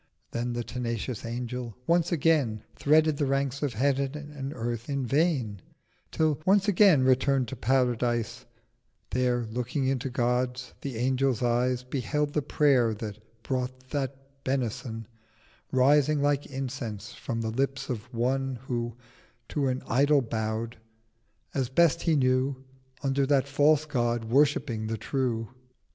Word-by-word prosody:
Then 120 +1 -2
the 120 0 -2
tenacious 115 -1 -4
Angel 120 -1 -4
once 170 +2 +2
again 145 -9 +2
Threaded 155 0 +3
the 145 - +1
Ranks 135 0 0
of 145 -5 -1
Heav'n 135 +3 +1 0.2
and 135 -1 -4
Earth—in 120 +2 -3
vain— 130 - +1 0.5
Till, 155 -2 +1
once 195 +3 +4
again 190 -8 +6
return'd 130 0 +3
to - - -5
Paradise, 120 -1 0 0.6
There, 125 -1 +1
looking 125 +4 -2
into 135 0 0
God's, 125 0 -1
the 135 -5 -4
Angel's 130 0 +1
Eyes 125 +1 +1
Beheld 145 +3 -1
the 150 - +1
Prayer 135 -6 +3
that 105 0 -6 0.2
brought 130 0 -3
that 135 -1 -5
Benison 120 -3 -2 0.7
Rising 145 +3 +4
like 145 0 +1
Incense 125 -6 -5
from 115 -3 -4
the 110 -1 -2
Lips 135 +3 -1
of 120 0 -5
one 130 +2 0
Who 120 -2 -3 0.5
to 145 -3 0
an 130 0 -1
Idol 140 +3 +4
bowed—as 115 +2 -5
best 165 +3 +3
he 165 -2 +2
knew 130 0 +2 0.5
Under 135 0 +1
that 140 -1 +3
False 145 +2 +3
God 120 -5 0
worshipping 120 -3 +2
the 110 0 -2
True. 115 -1 -1
130 Hz, 130 wpm, -28 LUFS, 120-140 Hz, 0.7 s, again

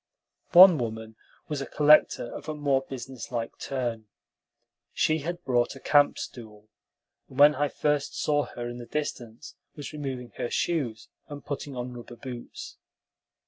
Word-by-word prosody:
One 180 -2 +9
woman 110 -1 -5 0.3
was 150 -2 -3
a - - -5
collector 150 -5 +4
of - - -8
a 155 - -3
more 140 -3 +1
businesslike 125 -2 -6
turn. 120 -5 -3 0.9
She 155 0 +1
had 175 +4 -5
brought 120 -3 +1
a - - -10
camp 145 +1 +3
stool, 110 -3 -9 0.6
and 130 - -13
when 145 +1 +8
I 145 +1 0
first 150 -1 -1
saw 145 -1 +1
her 120 0 -7
in 120 0 -7
the 120 - -9
distance 125 -4 -5 0.2
was 145 0 -8
removing 135 -5 -5
her 120 - -2
shoes, 130 -11 -2 0.2
and 145 -1 -9
putting 140 -1 -5
on 125 0 -5
rubber 120 0 -10
boots. 125 -1 -9
135 Hz, 150 wpm, -27 LUFS, 120-145 Hz, 0.9 s, One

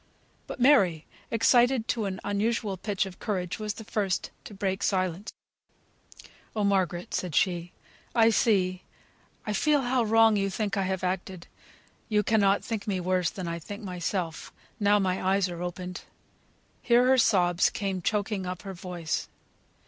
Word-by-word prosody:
But - - -7
Mary, 195 - +4 0.2
excited 240 +1 +3
to 225 -3 0
an 190 -1 -4
unusual 205 0 -1
pitch 195 +1 -2
of 190 -2 -10
courage, 185 -3 -3
was 210 -1 -3
the 220 - -8
first 200 -3 -2
to - - -9
break 190 0 -2
silence. 185 +1 -1 1.2
"Oh, 210 - 0
Margaret!" 185 -3 0
said 180 -4 -2
she, 175 -2 +1 0.4
"I 230 -1 +5
see 190 -4 +2 0.6
I 210 - -2
feel 295 +7 +2
how 250 0 +1
wrong 225 0 +4
you 195 0 0
think 205 +1 -2
I 195 -1 0
have 190 -1 -2
acted; 185 -1 -3 0.6
you 210 -1 +2
cannot 200 -2 +3
think 220 -4 -4
me 195 -3 0
worse 180 -2 +1
than 185 -3 -6
I 170 0 -3
think 205 +6 -8
myself, 180 -2 -3 0.3
now 205 0 +4
my 190 -2 0
eyes 190 0 +2
are 175 -1 -6
opened." 180 +1 -5 0.8
Here 240 +1 +4
her 260 0 +4
sobs 180 -6 +3
came 195 -3 -3
choking 205 0 -1
up 180 +1 -5
her 195 -1 -6
voice. 175 -3 -4
195 Hz, 155 wpm, -27 LUFS, 180-215 Hz, 1.2 s, I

